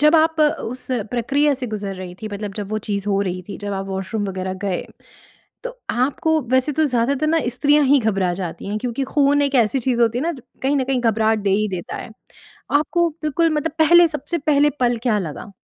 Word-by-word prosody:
जब 300 +2 +5
आप 320 0 +3
उस 255 -4 0 0.2
प्रक्रिया 280 +5 +1
से 255 -1 -4
गुज़र 205 -3 -4
रहीं 180 -1 -7
थीं, 215 - -4
मतलब 205 0 -5
जब 205 -1 -5
वो 215 - -1
चीज़ 200 0 -2
हो 200 0 +2
रही 185 -1 -3
थी, 200 - -6
जब 205 0 -4
आप 195 0 -3
वॉशरूम 195 +2 -3
वग़ैरह 185 0 -3
गए। 190 -3 -2 0.8
तो - - -3 0.2
आपको 290 +5 +1
वैसे 260 +3 +2
तो 315 +2 +2
ज़्यादातर 265 +3 +1
ना 325 +1 +2
स्त्रियाँ 290 +4 +3
ही 280 +1 +5
घबरा 195 -5 +1
जाती 180 -3 -6
हैं 210 +1 -2
क्योंकि 250 +3 -2
खून 285 +1 +2
एक 280 0 0
ऐसी 260 +5 -1
चीज़ 240 -1 +1
होती 230 +1 +2
है - - -1
ना 340 - 0
ज 275 - -10 0.2
कहीं 275 +2 +2
न 265 - +1
कहीं 260 -1 0
घबराहट 220 -1 +2
दे 200 - 0
ही 210 +2 +2
देता 180 -3 -5
है। - - -8 0.7
आपको 340 +3 +1
बिल्कुल 315 +2 +1
मतलब 300 +1 -1
पहले 345 +2 +7
सबसे 310 +3 -3
पहले 295 -1 +3
पल 240 -1 +2
क्या 225 -5 +2
लगा? 180 +4 -6
250 Hz, 220 wpm, -21 LUFS, 205-290 Hz, 0.8 s, पहले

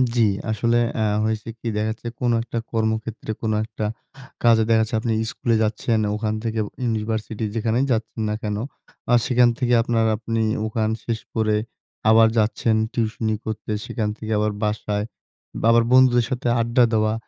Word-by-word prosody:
জি, 120 - +3 0.3
আসলে 115 +2 +1 0.2
আ - - +1 0.2
হয়েছে 110 0 -2
কি? 120 - -6
দেখা 105 +1 0
যাচ্ছে 115 +2 -8
কোন 120 -1 +1
একটা 120 - -5
কর্মক্ষেত্রে, 110 0 -2
কোন 110 - 0
একটা 110 -1 -5 0.6
কাজে 115 -2 +5
দেখা 115 -1 +5
যাচ্ছে 110 +2 -1
আপনি 115 0 -1 0.2
স্কুলে 115 -1 0
যাচ্ছেন। 110 +1 0 0.2
ওখান 105 0 -1
থেকে 115 -1 -2 0.2
ইউনিভার্সিটি, 110 -1 -2
যেখানে 115 +1 0
যাচ্ছেন 110 -1 -2
না 105 - -1
কেন? 105 -1 -2 0.6
আর 120 - +6
সেখান 125 -1 +5
থেকে 125 -1 +1
আপনার 115 -1 +1
আপনি 115 +1 -2 0.3
ওখান 110 0 -1
শেষ 115 -2 -2 0.2
করে 110 -1 +2 0.5
আবার 110 0 +7
যাচ্ছেন 110 +1 +2 0.2
টিউশনি 110 -1 -1
করতে। 110 0 -4
সেখান 110 -4 -2
থেকে 110 -1 -6
আবার 105 0 +1
বাসায়, 105 -1 -1 0.6
বাবার 115 +1 +5
বন্ধুদের 125 -2 +5
সাথে 125 -1 -2
আড্ডা 120 +2 +3
দেওয়া। 110 0 +2
110 Hz, 160 wpm, -22 LUFS, 110-115 Hz, 0.6 s, আবার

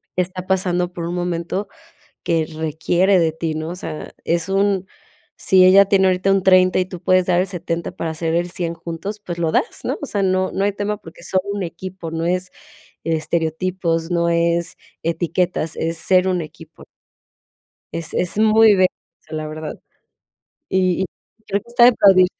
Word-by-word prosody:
está 185 0 -3
pasando 180 -2 0
por 170 -1 -5
un 175 - -3
momento 175 +3 -2 0.6
que 165 -1 +1
requiere 165 +4 +1
de 165 -2 +2
ti, 160 0 -3
¿no? 155 +1 -4
O 175 - -5
sea, 160 -4 -7
es 170 +2 0
un 195 -1 +1 0.5
Si 190 -1 +4
ella 195 +2 +7
tiene 190 -1 +3
ahorita 185 +1 +2
un 195 0 +3
30 185 -1 +5
y 185 - +1
tú 180 -1 -9
puedes 185 -1 +3
dar 175 -1 +3
el - - 0
70 170 -2 -4
para 165 -1 -4
hacer 160 +1 -2
el 175 +1 0
100 170 -2 -3
juntos, 170 +6 -6
pues 175 -4 -6
lo 165 -2 +1
das, 465 - 0
¿no?, - - -1
o - - -3
sea, 200 -5 -1
no 185 0 +1
no 195 - -1
hay 205 - +2
tema 205 +1 -2
porque 170 -3 -14
son 185 +1 +1
un 205 - -3
equipo, 175 0 -7
no 165 0 -2
es 180 +1 0 0.6
estereotipos, 165 +1 -1
no 170 0 +1
es 170 0 +1 0.3
etiquetas, 170 0 -1
es 165 0 -2
ser 185 +2 +2
un 180 -1 0
equipo. 155 - -12 1.1
Es 165 -1 -4
es 180 +3 -1
muy, 220 0 +6
bello 185 -1 +5 0.3
eso 155 0 -9
la 155 0 -4
verdad. 155 0 -6 0.9
Y 185 -1 +1
y - - +1 0.4
creo 200 0 0
que 235 - -23
está 240 0 +5
de 245 - +9
aplaudir. 195 -5 +6
180 Hz, 185 wpm, -20 LUFS, 165-190 Hz, 1.1 s, de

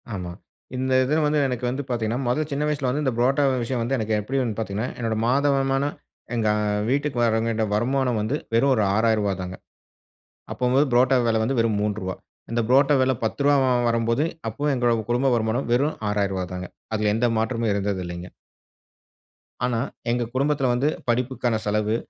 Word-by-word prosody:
ஆமா. 90 -2 -5 0.5
இந்த 130 0 0
இத 150 +5 +1
வந்து 150 0 +2
எனக்கு 125 -1 -3
வந்து 135 +3 -3
பாத்தீங்கன்னா, 120 +1 -1
முத 150 +6 +1
சின்ன 140 +2 -1
வயசுல 140 -4 -1
வந்து 150 +4 -1
இந்த 130 - +1
புரோட்டா 135 +4 +2 0.2
விஷயம் 120 0 -2
வந்து 130 +4 0
எனக்கு 110 -1 -1
எப்டி 135 +6 -2
வந் 115 -4 -2
பாத்தீங்கனா, 110 +2 -2
என்னோட 115 -2 -1
மாத 140 +3 +2
வருமானம் 135 +1 0 0.4
எங்க 110 -2 0 0.4
வீட்டுக்கு 140 -1 0
வருவேண்டிய 115 -1 +1
வருமானம் 125 0 +1
வந்து 125 +8 -1 0.2
வெறும் 135 +4 +4
ஒரு 110 - +2
ரூ.6,000 110 -3 +2
தாங்க. 90 0 -5 1.0
அப்போ 125 -1 -1
வந்து 140 -2 +3
புரோட்டா 130 +2 +4
வில 110 -1 +2
வந்து 130 +1 -1
வெறும் 110 -3 +1
ரூ.3வா 100 -3 -2 0.4
இந்த 120 0 0
புரோட்டா 135 +3 +5
விலை 130 0 +3
10ரூவா 140 +2 +2 0.2
வரும்போது 115 +5 +1 0.2
அப்போ 145 +7 -2
எங்ளோட 120 -2 +2 0.2
குடும்ப 125 +3 +2
வருமானம் 115 +2 -1
வெறும் 140 +5 +2
6,000ரூவாதாங்க. 95 -3 -2 0.3
அதுல 105 -1 +1
எந்த 120 +2 +2
மாற்றமும் 115 0 0
இருந்ததில்லைங்க. 95 -3 -3 1.4
ஆனா 120 -2 0 0.3
எங்க 120 0 0
குடும்பத்துல 140 0 +1
வந்து 130 +4 +1 0.2
படிப்புக்கான 125 -1 0
செலவு, 105 +1 +1
120 Hz, 160 wpm, -24 LUFS, 110-135 Hz, 1.4 s, புரோட்டா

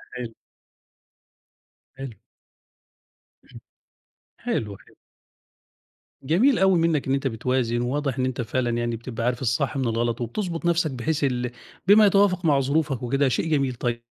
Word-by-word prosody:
حلو. 120 -2 -6 1.7
حلو. 135 -3 -6 1.3
إمم - - -14 0.8
حلو، 105 -3 -3
ح - - -21 1.4
جميل 210 - +3
أوي 190 -2 +4
منّك 165 -3 +1
إن 135 - +2
أنت 135 0 -1
بتوازن، 120 0 0
وواضح 135 +1 -2
إن 130 - +1
أنت 130 -1 -2
فعلًا 120 +2 -1
يعني 120 0 -1
بتبقى 115 0 -5
عارف 120 0 -1
الصح 130 +4 0
من 130 -3 0
الغلط 115 +1 -1
وبتضبُط 165 - -3
نَفْسك 170 -2 +2
بحيث 140 +4 -2
ال 125 -2 -1 0.4
بما 210 +2 +7
يتوافق 195 -2 +3
مع 145 -4 +4
ظروفك 140 -1 0
وكده، 135 +3 +1
شيء 130 - -1
جميل 140 -5 +1
طيب 120 -1 -3
130 Hz, 140 wpm, -24 LUFS, 120-160 Hz, 1.7 s, بما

